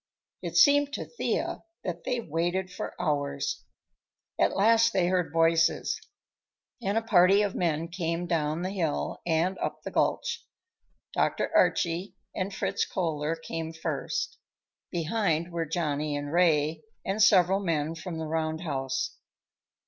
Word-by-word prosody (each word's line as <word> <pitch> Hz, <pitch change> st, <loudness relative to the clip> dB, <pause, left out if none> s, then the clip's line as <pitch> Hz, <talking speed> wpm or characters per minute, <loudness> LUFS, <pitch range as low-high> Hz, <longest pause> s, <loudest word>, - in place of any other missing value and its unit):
It 170 Hz, -1 st, -3 dB
seemed 285 Hz, +5 st, +6 dB
to -, -, -3 dB
Thea 475 Hz, -, -2 dB, 0.2 s
that 170 Hz, -2 st, -5 dB
they 250 Hz, -2 st, 0 dB
waited 175 Hz, 0 st, -1 dB
for -, -, -6 dB
hours. 145 Hz, -, -1 dB, 0.7 s
At -, -, +2 dB
last 230 Hz, +3 st, +5 dB
they 185 Hz, -2 st, +3 dB
heard 180 Hz, -2 st, +1 dB
voices, 165 Hz, 0 st, +2 dB, 0.8 s
and 205 Hz, -1 st, 0 dB
a 225 Hz, -, +1 dB
party 195 Hz, -1 st, +5 dB
of 205 Hz, -, -1 dB
men 165 Hz, -2 st, 0 dB
came 170 Hz, 0 st, -2 dB
down 160 Hz, -1 st, 0 dB
the 185 Hz, -, -2 dB
hill 170 Hz, -7 st, -2 dB
and 170 Hz, +3 st, +1 dB
up -, -, -3 dB
the -, -, -5 dB
gulch. -, -, 0 dB, 0.7 s
Dr. -, -, 0 dB
Archie 175 Hz, +3 st, +2 dB, 0.2 s
and 190 Hz, +1 st, -2 dB
Fritz -, -, -1 dB
Kohler 160 Hz, -3 st, -1 dB
came 165 Hz, 0 st, -5 dB
first; 305 Hz, -, -3 dB, 0.5 s
behind 170 Hz, -1 st, 0 dB
were 165 Hz, -2 st, -2 dB
Johnny 150 Hz, -2 st, -1 dB
and 145 Hz, +1 st, -5 dB
Ray, 160 Hz, -3 st, +3 dB, 0.2 s
and 200 Hz, +3 st, 0 dB
several 190 Hz, -2 st, +5 dB
men 165 Hz, -5 st, -1 dB
from 165 Hz, +1 st, -6 dB
the 160 Hz, -, -3 dB
roundhouse. 155 Hz, -4 st, -2 dB
170 Hz, 135 wpm, -28 LUFS, 160-190 Hz, 0.8 s, seemed